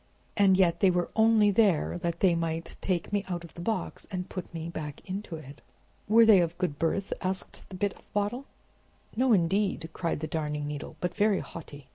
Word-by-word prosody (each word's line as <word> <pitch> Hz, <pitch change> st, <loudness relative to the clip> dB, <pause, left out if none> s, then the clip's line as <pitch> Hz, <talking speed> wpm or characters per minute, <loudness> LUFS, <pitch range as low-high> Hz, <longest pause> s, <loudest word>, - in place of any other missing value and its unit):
And 195 Hz, -2 st, +5 dB
yet 170 Hz, -3 st, +3 dB
they 195 Hz, -, +5 dB
were 175 Hz, -1 st, 0 dB
only 220 Hz, -2 st, +5 dB
there 195 Hz, -5 st, +2 dB
that 170 Hz, -1 st, -3 dB
they 185 Hz, -3 st, +5 dB
might 165 Hz, 0 st, -2 dB
take 185 Hz, +1 st, -1 dB
me 205 Hz, -1 st, +1 dB
out 175 Hz, -2 st, -3 dB
of 170 Hz, -, -12 dB
the 170 Hz, -, -8 dB
box 220 Hz, +5 st, -3 dB
and 180 Hz, -2 st, -4 dB
put 185 Hz, -, -7 dB
me 165 Hz, -1 st, -5 dB
back 155 Hz, -3 st, -6 dB
into 190 Hz, -2 st, -5 dB
it." 145 Hz, -3 st, -11 dB, 0.5 s
"Were 225 Hz, +2 st, +7 dB
they 215 Hz, -4 st, +7 dB
of 170 Hz, 0 st, -2 dB
good 180 Hz, -6 st, -2 dB
birth?" 190 Hz, +4 st, 0 dB
asked 185 Hz, 0 st, -4 dB
the 190 Hz, -, -8 dB
Bit 200 Hz, +1 st, -1 dB
of -, -, -22 dB
Bottle. 210 Hz, +6 st, -1 dB, 0.7 s
"No, 255 Hz, +2 st, +2 dB
indeed," 190 Hz, -2 st, +2 dB
cried 170 Hz, -4 st, -2 dB
the 155 Hz, -, -3 dB
Darning 150 Hz, -2 st, -2 dB
Needle, 145 Hz, 0 st, -6 dB
"but 180 Hz, -1 st, -1 dB
very 205 Hz, -1 st, +2 dB
haughty. 145 Hz, -4 st, -10 dB
180 Hz, 200 wpm, -28 LUFS, 165-205 Hz, 0.7 s, Were